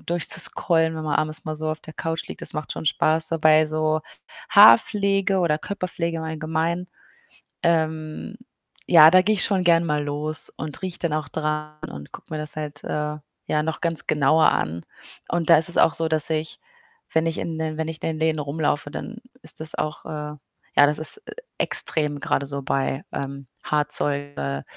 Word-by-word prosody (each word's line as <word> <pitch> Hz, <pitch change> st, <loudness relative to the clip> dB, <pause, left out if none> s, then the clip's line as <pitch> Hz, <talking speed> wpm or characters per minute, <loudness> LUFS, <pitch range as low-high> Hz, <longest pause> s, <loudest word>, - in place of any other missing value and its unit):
durchzuscrollen, 165 Hz, -1 st, +1 dB
wenn 155 Hz, -, -5 dB
man 150 Hz, -, 0 dB
abends 155 Hz, 0 st, -3 dB
mal 155 Hz, 0 st, -4 dB
so 155 Hz, 0 st, -3 dB
auf 155 Hz, -, -5 dB
der 155 Hz, -, -12 dB
Couch 165 Hz, 0 st, -4 dB
liegt, -, -, -8 dB
das -, -, -2 dB
macht 155 Hz, 0 st, -4 dB
schon -, -, -7 dB
Spaß. 160 Hz, +2 st, +3 dB
Dabei 155 Hz, -1 st, +4 dB
so 155 Hz, 0 st, 0 dB, 0.5 s
Haarpflege 195 Hz, -, +5 dB
oder 155 Hz, -3 st, +1 dB
Körperpflege 175 Hz, -3 st, -4 dB
im 160 Hz, -, -5 dB
Allgemeinen, 160 Hz, +3 st, -2 dB, 0.8 s
ähm, 160 Hz, +3 st, -1 dB, 0.5 s
ja, 160 Hz, -2 st, +9 dB
da 185 Hz, +1 st, +6 dB
gehe 215 Hz, +3 st, +1 dB
ich 185 Hz, -, +3 dB
schon 190 Hz, -3 st, +1 dB
gerne 170 Hz, 0 st, +4 dB
mal 150 Hz, -2 st, -1 dB
los 150 Hz, +2 st, 0 dB
und 155 Hz, +3 st, -6 dB
rieche 185 Hz, -2 st, -5 dB
dann 165 Hz, -3 st, -1 dB
auch 155 Hz, -2 st, -2 dB
dran 150 Hz, 0 st, -3 dB
und 70 Hz, 0 st, -10 dB
gucke -, -, -11 dB
mir -, -, -2 dB
das 150 Hz, 0 st, -4 dB
halt, 150 Hz, -1 st, -6 dB
äh, 150 Hz, 0 st, -3 dB, 0.3 s
ja, 150 Hz, 0 st, +1 dB
noch 160 Hz, 0 st, -3 dB
ganz 165 Hz, -2 st, -1 dB
genauer 155 Hz, +2 st, +4 dB
an 85 Hz, +2 st, -2 dB, 0.5 s
und 170 Hz, -1 st, -1 dB
da 165 Hz, -, +9 dB
ist 160 Hz, +2 st, +1 dB
es -, -, 0 dB
auch 160 Hz, -, +4 dB
so, 165 Hz, 0 st, 0 dB
dass 155 Hz, -1 st, +3 dB
ich, 155 Hz, 0 st, -3 dB, 0.5 s
wenn 160 Hz, 0 st, +2 dB
ich 165 Hz, -1 st, -2 dB
in 165 Hz, -1 st, -4 dB
den 155 Hz, -1 st, -3 dB
wenn 160 Hz, 0 st, -2 dB
ich 160 Hz, -1 st, -7 dB
in -, -, 0 dB
den 155 Hz, -, -6 dB
Läden 160 Hz, -1 st, +1 dB
rumlaufe, 145 Hz, 0 st, -2 dB
dann 225 Hz, +6 st, -7 dB, 0.3 s
ist -, -, -3 dB
das 155 Hz, 0 st, 0 dB
auch, 155 Hz, 0 st, -4 dB
äh, -, -, -8 dB
ja 150 Hz, -1 st, -6 dB, 0.5 s
das 150 Hz, 0 st, 0 dB
ist 160 Hz, -, +2 dB
e -, -, -7 dB, 0.2 s
extrem 150 Hz, -2 st, +1 dB
grade 140 Hz, -, -1 dB
so 140 Hz, 0 st, -4 dB
bei, 135 Hz, +1 st, -2 dB
ähm, 140 Hz, -1 st, -6 dB, 0.2 s
Haarzeug, 145 Hz, -1 st, +1 dB
äh, 70 Hz, 0 st, -3 dB
155 Hz, 195 wpm, -23 LUFS, 150-165 Hz, 0.8 s, ja